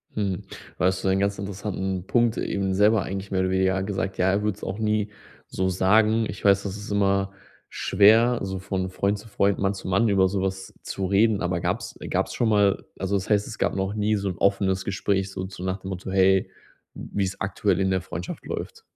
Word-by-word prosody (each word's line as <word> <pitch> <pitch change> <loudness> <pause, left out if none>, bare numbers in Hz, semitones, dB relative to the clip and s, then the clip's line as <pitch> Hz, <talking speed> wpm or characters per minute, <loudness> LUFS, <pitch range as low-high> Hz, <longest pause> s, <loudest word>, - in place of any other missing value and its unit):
Mhm. 100 -4 -2 0.4
Da - - +2
hast 95 0 +1
du - - 0
einen 95 - +2
ganz 100 0 0
interessanten 95 -1 -4
Punkt 120 -1 +2
eben 95 -1 -1
selber 105 0 +4
eigentlich 95 +1 -5
mehr 95 - +1
oder 95 - +1
weniger 95 0 +1
gesagt, 95 -1 -3
ja, 90 +1 +3
er 100 +1 0
würde 105 -3 0
es - - -16
auch 100 +3 -4
nie 105 -1 0 0.4
so 95 0 -1
sagen. 110 +4 +3
Ich - - -7
weiß, 100 -1 +4
das 100 0 -4
ist 105 0 -8
immer 100 -1 +1 0.4
schwer, 110 +5 +4
so 95 -1 -3
von 95 0 -3
Freund 100 +2 -1
zu 115 - -13
Freund, 100 -1 +1
Mann 95 0 +1
zu 95 - -8
Mann 100 +5 +2
über 95 -1 +4
so 95 0 -1
was 95 0 -3
zu 95 - -3
reden. 100 +2 +3
Aber 90 -1 0
gab - - -1
es, - - -9
äh - - -7
gab - - 0
es - - -8
schon 115 -2 +1
mal 100 -2 +2
also, 95 +1 -1
das 95 +1 -2
heißt, 105 -1 +2
es 110 - -8
gab - - 0
noch 95 +1 -1
nie 105 0 +1
so 100 -1 -1
'n 90 - -5
offenes 95 -1 +1
Gespräch 95 0 -1
so 95 -1 -4
zu 95 -1 -9
nach 95 +1 -2
dem 95 - -7
Motto: 95 0 -5
Hey, 95 0 +3 0.4
wie's 100 -1 -3
aktuell 95 -1 0
in 95 0 +1
der 95 -2 +1
Freundschaft 90 -1 -7
läuft. - - -6
95 Hz, 230 wpm, -25 LUFS, 95-100 Hz, 0.4 s, selber